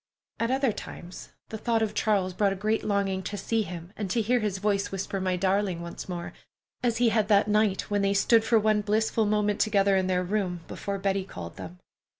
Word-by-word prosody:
At 230 Hz, -, 0 dB
other 265 Hz, -1 st, +2 dB
times, 180 Hz, -3 st, -9 dB, 0.2 s
the 220 Hz, -, -6 dB
thought 225 Hz, 0 st, +1 dB
of 210 Hz, -1 st, -2 dB
Charles 200 Hz, -4 st, +1 dB
brought 200 Hz, +1 st, +2 dB
a -, -, -5 dB
great 215 Hz, +3 st, 0 dB
longing 200 Hz, -2 st, 0 dB
to 205 Hz, +2 st, -5 dB
see 225 Hz, +2 st, 0 dB
him, 180 Hz, -2 st, -7 dB
and 205 Hz, -3 st, -4 dB
to 235 Hz, -, +1 dB
hear 240 Hz, +3 st, +2 dB
his 210 Hz, -3 st, -1 dB
voice 200 Hz, 0 st, 0 dB
whisper, 195 Hz, 0 st, -3 dB
"My 185 Hz, -1 st, 0 dB
darling," 190 Hz, -1 st, 0 dB
once 170 Hz, +2 st, -8 dB
more, 175 Hz, -1 st, -5 dB, 0.5 s
as 235 Hz, -2 st, +1 dB
he 240 Hz, -1 st, +4 dB
had 215 Hz, -2 st, +1 dB
that 205 Hz, 0 st, +4 dB
night 210 Hz, -2 st, +2 dB
when 205 Hz, 0 st, +2 dB
they 200 Hz, 0 st, +1 dB
stood 225 Hz, +3 st, +4 dB
for 225 Hz, 0 st, +3 dB
one 215 Hz, -1 st, +3 dB
blissful 215 Hz, +1 st, +1 dB
moment 210 Hz, -1 st, +1 dB
together 200 Hz, -2 st, +3 dB
in 190 Hz, -1 st, +1 dB
their 180 Hz, -1 st, +1 dB
room, 180 Hz, -2 st, -2 dB
before 200 Hz, 0 st, -4 dB
Betty 195 Hz, 0 st, 0 dB
called 85 Hz, -, -9 dB
them. 90 Hz, -1 st, -8 dB
200 Hz, 215 wpm, -27 LUFS, 190-215 Hz, 0.5 s, he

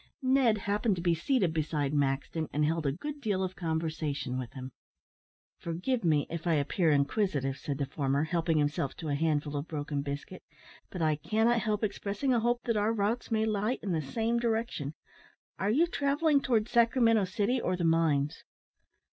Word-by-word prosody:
Ned 255 Hz, -4 st, +4 dB
happened 205 Hz, +1 st, 0 dB
to 175 Hz, -, -5 dB
be 175 Hz, -2 st, +3 dB
seated 180 Hz, -, +1 dB
beside 150 Hz, -2 st, -1 dB
Maxton, 145 Hz, +3 st, -1 dB
and 150 Hz, +1 st, +1 dB
held 160 Hz, -1 st, 0 dB
a -, -, +2 dB
good 290 Hz, -, -6 dB
deal 200 Hz, -5 st, 0 dB
of 185 Hz, 0 st, -3 dB
conversation 160 Hz, -6 st, -2 dB
with 125 Hz, -3 st, -6 dB
him. 130 Hz, 0 st, -7 dB, 0.9 s
"Forgive 180 Hz, +9 st, -2 dB
me, 155 Hz, -4 st, +3 dB
if 170 Hz, +1 st, -5 dB
I 165 Hz, -, +3 dB
appear 155 Hz, +4 st, +1 dB
inquisitive," 140 Hz, -2 st, +1 dB
said 140 Hz, 0 st, -4 dB
the 140 Hz, -, -1 dB
former, 140 Hz, +1 st, 0 dB
helping 165 Hz, 0 st, 0 dB
himself 145 Hz, -2 st, 0 dB
to 160 Hz, -3 st, -6 dB
a -, -, 0 dB
handful 150 Hz, -1 st, 0 dB
of 145 Hz, +3 st, -3 dB
broken 145 Hz, -2 st, -3 dB
biscuit, 140 Hz, +6 st, -6 dB, 0.5 s
"but 180 Hz, -3 st, -3 dB
I 155 Hz, -1 st, +2 dB
cannot 225 Hz, +8 st, +2 dB
help 215 Hz, -1 st, -1 dB
expressing 210 Hz, +5 st, -1 dB
a 240 Hz, -, +3 dB
hope 240 Hz, +1 st, 0 dB
that 230 Hz, -2 st, 0 dB
our 210 Hz, +2 st, +2 dB
routes 220 Hz, +3 st, -1 dB
may 220 Hz, -1 st, +1 dB
lie 215 Hz, +3 st, 0 dB
in 200 Hz, -, -2 dB
the 160 Hz, -2 st, 0 dB
same 225 Hz, -, -1 dB
direction 225 Hz, -, -2 dB, 0.6 s
are 195 Hz, -, 0 dB
you 290 Hz, +10 st, +4 dB
travelling 285 Hz, -2 st, +2 dB
towards 230 Hz, -4 st, +1 dB
Sacramento 230 Hz, -3 st, +4 dB
city 210 Hz, +6 st, 0 dB
or 180 Hz, 0 st, -1 dB
the 175 Hz, -, -2 dB
mines?" 160 Hz, -3 st, +1 dB
175 Hz, 180 wpm, -30 LUFS, 150-225 Hz, 0.9 s, Ned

